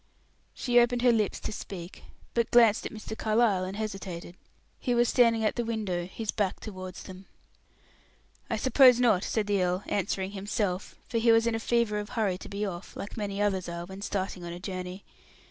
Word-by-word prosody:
She 245 -1 +3
opened 240 0 +2
her 245 - +6
lips 215 -3 +1
to - - -4
speak, 185 -4 -8 0.3
but 235 -1 +1
glanced 230 -3 +5
at - - -11
Mr. 220 0 -7
Carlyle 215 -4 +2
and 190 +2 -5
hesitated. 190 -5 -5 0.4
He 245 -2 0
was 240 0 +4
standing 230 -2 +4
at 215 - 0
the 240 - +1
window, 205 -7 -2
his 215 +2 -4
back 205 -4 -1
towards 185 -3 -8
them. 190 +1 -11 1.2
"I 225 - 0
suppose 255 +1 +6
not," 220 -7 +4
said 220 -2 0
the 200 -2 +1
earl, 180 +1 0
answering 195 -1 -1
himself, 200 -1 -2
for 230 - 0
he 230 0 +5
was 225 0 +5
in 235 - +1
a 225 - -1
fever 225 -2 +1
of 205 - -6
hurry 200 -5 0
to - - -9
be 200 +1 -2
off, 180 -2 -7
like 200 - -6
many 205 -2 -3
others 190 -4 0
are 170 0 -5
when 190 +2 -9
starting 190 -3 -3
on 170 0 -5
a 175 - -7
journey. 185 0 -6
205 Hz, 195 wpm, -28 LUFS, 185-230 Hz, 1.2 s, her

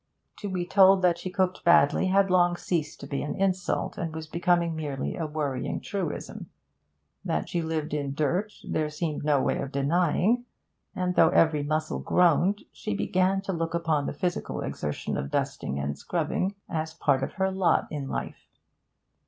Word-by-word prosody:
To 205 - -5
be 180 -2 -2
told 190 0 +5
that 175 -1 +3
she 185 - -4
cooked 185 0 -1
badly 170 +1 +5
had 195 0 +3
long 175 -1 +4
ceased 160 -4 -2
to - - -6
be 140 - -3
an 145 - -3
insult, 190 -2 -1
and 165 -1 -3
was 160 0 -5
becoming 170 +1 +1
merely 145 -4 -3
a 160 - -3
worrying 145 -4 -2
truism. 190 -7 -5 0.7
That 80 - -1
she 170 - -1
lived 160 -2 -3
in 140 -2 -2
dirt 175 +8 0 0.2
there 155 -1 0
seemed 150 0 -3
no 145 -2 +3
way - - 0
of 140 - -4
denying, 175 - +2 0.5
and 180 0 0
though 165 -2 +5
every 160 -4 +3
muscle 155 +2 -1
groaned, 180 +3 +3
she 100 - -4
began 185 - +1
to 195 -1 -3
look 165 0 -2
upon 160 -4 0
the - - -3
physical 175 +4 -2
exertion 75 - -3
of 70 - -3
dusting 70 - -2
and 70 +1 -2
scrubbing 180 - -2
as 160 -1 -3
part 140 -5 +2
of 135 - -3
her 190 -1 0
lot 190 -3 +2
in 145 -3 -4
life. - - -5
165 Hz, 175 wpm, -27 LUFS, 150-185 Hz, 0.7 s, told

